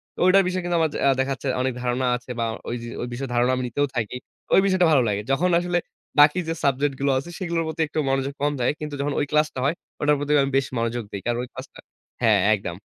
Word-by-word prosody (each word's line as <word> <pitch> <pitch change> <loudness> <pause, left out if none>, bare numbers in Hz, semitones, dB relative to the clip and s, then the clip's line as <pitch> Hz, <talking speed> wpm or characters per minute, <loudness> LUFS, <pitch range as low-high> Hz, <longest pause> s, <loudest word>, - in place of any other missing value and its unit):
তো - - -12
ঐটার 195 +1 +6
বিষয়ে 185 0 -2
কিন্তু 175 -1 0
আমার 160 -1 +2
যা - - -3
আ - - +6
দেখা 135 +1 +1
যাচ্ছে 135 +2 -6
অনেক 130 -1 0
ধারণা 125 +1 0
আছে 125 +1 -9
বা 115 - +1 0.2
ওইযে 120 0 -4
ওই 120 - -3
বিষয়ে 135 +2 -4
ধারণা 120 +1 +3
আমি 130 - -2
নিতেও 145 +4 0
থাকি। 120 +1 -2 0.4
ওই - - +7
বিষয়টা 185 -3 +3
ভালো 135 -5 +5
লাগে। 105 -1 0
যখন 180 +7 +2
আসলে 175 0 0 0.4
বাকি 150 +4 +6
যে 165 - 0
subject 140 +1 +1
গুলো 140 0 +2
আছে 140 +6 -4
সেগুলোর 170 -3 -1
প্রতি 160 +1 -3
একটু 155 +1 -3
মনোযোগ 135 +1 0
কম 145 - +2
যায়। 120 - +2
কিন্তু 150 -2 -5
যখন 145 0 -1
ওই 145 - +1
ক্লাসটা 150 -3 +1
হয় 150 +5 +1 0.3
ওটার 150 0 +4
প্রতি 145 +1 -2
আমি 135 - -2
বেশ 135 - +1
মনোযোগ 115 0 -1
দেই। 100 - -5
কারণ 120 0 0
ওই 125 - -8
ক্লাসটা - - -10 0.4
হ্যাঁ, 110 -4 +4 0.2
একদম। 85 -4 -6
140 Hz, 245 wpm, -24 LUFS, 125-155 Hz, 0.4 s, ওই